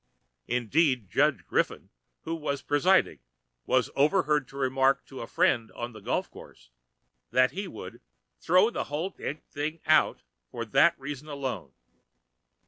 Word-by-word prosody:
Indeed, 125 - +1
Judge - - +2
Griffin, - - -1 0.3
who 165 - -4
was 145 -4 -3
presiding, 180 +6 +3 0.5
was - - +2
overheard 150 -2 +2
to 135 - -12
remark 135 +1 +2
to 135 - -9
a 115 - -6
friend 115 -3 +1
on 120 0 -6
the 110 - -10
golf - - -1
course - - -15 0.6
that 130 0 +3
he 195 +4 -4
"would 110 - -9 0.4
throw 185 +7 +4
the - - -3
whole 155 +7 -3
d - - -17
n 150 - -4
thing 155 +3 -4
out" 155 0 +3 0.3
for 115 -1 -5
that 140 +9 +4
reason 140 +2 -7
alone. 130 - -5
140 Hz, 145 wpm, -28 LUFS, 125-155 Hz, 0.6 s, throw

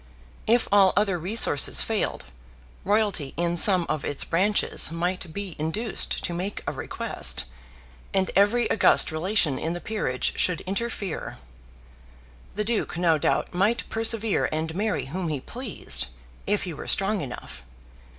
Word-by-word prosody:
If 235 +2 +3
all 195 -2 +5
other 200 -4 +1
resources 180 - +4
failed, - - -1 0.6
royalty 200 -8 0
in 170 0 0
some 180 0 +5
of 155 -2 -2
its 145 - -1
branches 195 0 +2
might 175 +1 -3
be 195 -1 -6
induced 200 +9 -2
to 175 - -3
make 185 +4 -4
a - - -2
request, - - -3 0.7
and 190 -1 +1
every 205 +5 +3
august 205 - +5
relation 160 -3 +1
in 165 +2 -2
the 175 - -5
peerage 175 -12 -2
should 180 -2 +1
interfere. 200 -2 -4 1.2
The 210 - -1
Duke 220 -5 -2
no 165 -3 +2
doubt - - 0
might 200 +6 +1
persevere 225 -1 +1
and 160 +1 -3
marry 210 +4 -1
whom 175 +6 -4
he 150 -3 -2
pleased, 235 - 0 0.4
if 205 - 0
he 180 - -5
were - - -9
strong 195 +1 0
enough. 125 - -8
185 Hz, 140 wpm, -25 LUFS, 165-210 Hz, 1.2 s, all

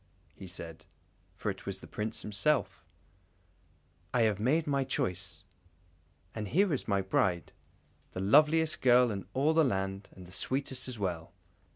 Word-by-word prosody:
he 95 - -10
said, 85 -2 -8 0.5
for - - -2
it - - -11
was - - -2
the - - -11
Prince 110 +2 -4
himself, 105 +8 0 1.3
"I 120 - +4
have 105 -3 +2
made 150 +9 +2
my 140 -2 +1
choice, 95 -8 -2 0.9
and 110 -2 -4
here 185 - +2
is 135 - -3
my 100 -2 +2
bride, 90 -3 0 0.6
the - - -4
loveliest 155 +10 +4
girl 125 -1 +5
in 100 -4 -5
all 145 +4 +3
the 160 0 +5
land, 95 -5 -1
and 95 - -11
the 90 - -14
sweetest 130 +6 -1
as 125 -2 -6
well!" 90 -5 -3
110 Hz, 155 wpm, -31 LUFS, 95-140 Hz, 1.3 s, girl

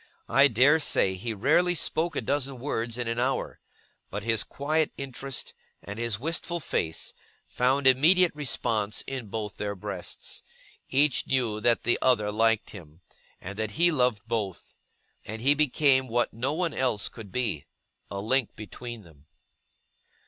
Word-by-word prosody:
I 140 +1 +6
dare 135 +6 +4
say 95 -10 +2
he 100 +5 -4
rarely 160 - +3
spoke 165 0 0
a - - 0
dozen 135 +2 -1
words 120 -3 -3
in 120 -1 -2
an 115 +1 -1
hour: 130 +2 -1 0.5
but 100 +1 -5
his 115 -1 +1
quiet 155 +3 -1
interest, 135 0 -5 0.3
and 105 +2 -7
his 115 -3 -1
wistful 165 +4 -1
face, 80 - -2 0.3
found 130 +3 +1
immediate 160 +8 +5
response 115 -7 -1
in 130 -4 -5
both 105 -1 -5
their 100 -1 -3
breasts; 95 -2 -5 0.5
each 140 +1 +3
knew 120 -5 0
that 120 +1 +2
the 120 - +2
other 105 -5 +3
liked 115 +1 +2
him, 85 -4 -12 0.4
and 100 +3 -8
that 110 -1 -2
he 175 +1 +5
loved 125 -7 +1
both; 105 -5 -3 0.5
and 110 +2 -6
he 140 +2 +6
became 140 -2 +3
what 120 +1 0
no 125 +5 -1
one 170 0 -1
else 125 -6 0
could 110 -5 -10
be 115 - -2 0.4
a 100 - -4
link 120 +4 0
between 115 +2 -8
them. 75 -4 -20
120 Hz, 155 wpm, -27 LUFS, 105-140 Hz, 0.5 s, I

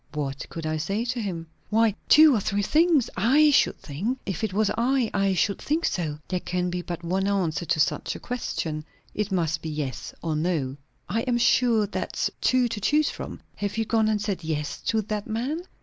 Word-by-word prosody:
"What 140 -2 -4
could 165 -1 -6
I 155 0 -1
say 200 +9 -1
to 245 0 -2
him?" 175 -6 -4 0.2
"Why, 225 0 +3 0.2
two 305 -1 +8
or 225 - +2
three 200 +1 -1
things, 315 - +3
I 275 +10 +5
should 280 - +3
think. 195 - -3
If 195 +1 -3
it 220 - 0
was 210 +1 +1
I, 245 +1 +1
I 195 -1 +2
should 200 +2 +1
think 320 +3 0
so." 155 -5 -1
"There 185 - -1
can 180 0 -2
be 180 0 -2
but 175 -1 -6
one 190 +3 0
answer 175 -5 0
to 160 0 0
such 150 - +1
a - - -7
question. 160 -10 -3 0.3
It 210 -1 -2
must 165 -4 0
be 160 - -4
yes 150 -4 -4
or 160 -2 -1
no." 150 -5 -1 0.3
"I 225 - 0
am 240 - +2
sure 235 -2 +3
that's 205 - -2
two 255 -1 +3
to 220 -2 -4
choose 300 +7 +2
from. - - -7 0.2
Have 205 +1 -3
you 225 - +1
gone 220 0 +2
and 215 -1 +1
said 200 -4 -3
yes 150 -2 -3
to 220 -1 +2
that 210 0 -4
man?" 255 +9 -2
200 Hz, 210 wpm, -26 LUFS, 165-230 Hz, 0.3 s, two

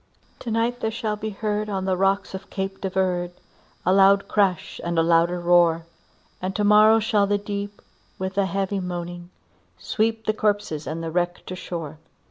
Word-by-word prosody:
"To 240 - -6
night 230 +2 0
there 220 - -1
shall 220 -1 -2
be 215 +1 -4
heard 210 0 -2
on 190 -2 -2
the 190 -1 +1
rocks 195 +2 +1
of 190 +1 -8
Cape 195 0 -4
de 190 - -1
Verde, 180 -2 -1 0.5
A 185 - +4
loud 195 0 +5
crash, 195 -5 0
and 170 0 -2
a 165 - +4
louder 170 +1 +3
roar; 170 -1 +3 0.6
And 185 +1 -3
to 210 - 0
morrow 215 +2 +6
shall 210 -2 +2
the 205 0 +2
deep, 205 0 -6 0.3
with 190 0 -4
a 200 -1 +2
heavy 195 +2 -1
moaning, 175 -1 -5 0.5
sweep 220 - -1
The 215 - +1
corpses 205 -8 -1
and 165 +1 -4
wreck 175 0 -1
to - - -6
the - - -4
shore." 165 -4 -6
195 Hz, 185 wpm, -24 LUFS, 175-210 Hz, 0.6 s, morrow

